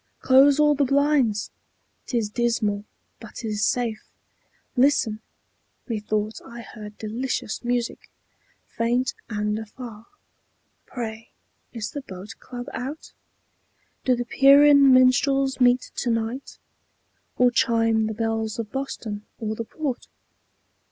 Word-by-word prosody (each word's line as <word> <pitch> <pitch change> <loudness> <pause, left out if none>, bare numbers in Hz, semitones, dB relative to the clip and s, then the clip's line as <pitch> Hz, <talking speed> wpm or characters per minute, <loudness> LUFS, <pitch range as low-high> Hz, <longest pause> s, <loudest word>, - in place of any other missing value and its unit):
Close 275 +2 +5
all 300 0 +5
the 285 0 +1
blinds; 275 -6 +2 0.6
't 245 - -1
is 220 -3 0
dismal, 215 -3 0 0.3
but - - -12
't 230 - -5
is 210 0 -1
safe. 230 -3 0 0.7
Listen! 245 -5 +2 0.7
Methought 215 -1 -2
I 235 0 -10
heard 210 -2 -10
delicious 235 +1 -3
music, 240 -1 -2 0.6
Faint 245 +2 0 0.2
and 210 0 -1
afar. 220 0 -10 0.8
Pray, 225 -2 -6 0.4
is 225 -3 -5
the 285 - -5
Boat 195 -2 -9
Club 245 -1 -8
out? 275 +5 -6 0.9
Do 255 - +3
the 245 0 -3
Pierian 280 +1 +6
minstrels 265 +1 +3
meet 250 0 +3
to 245 - -1
night? 230 +4 -3 0.8
Or 250 0 +4
chime 225 -2 +2
the 220 - -4
bells 225 -1 -2
of 225 -3 -5
Boston, 225 -6 -5
or 220 -1 -3
the 230 +1 -5
Port? 275 -1 -4
235 Hz, 120 wpm, -24 LUFS, 220-265 Hz, 0.9 s, Pierian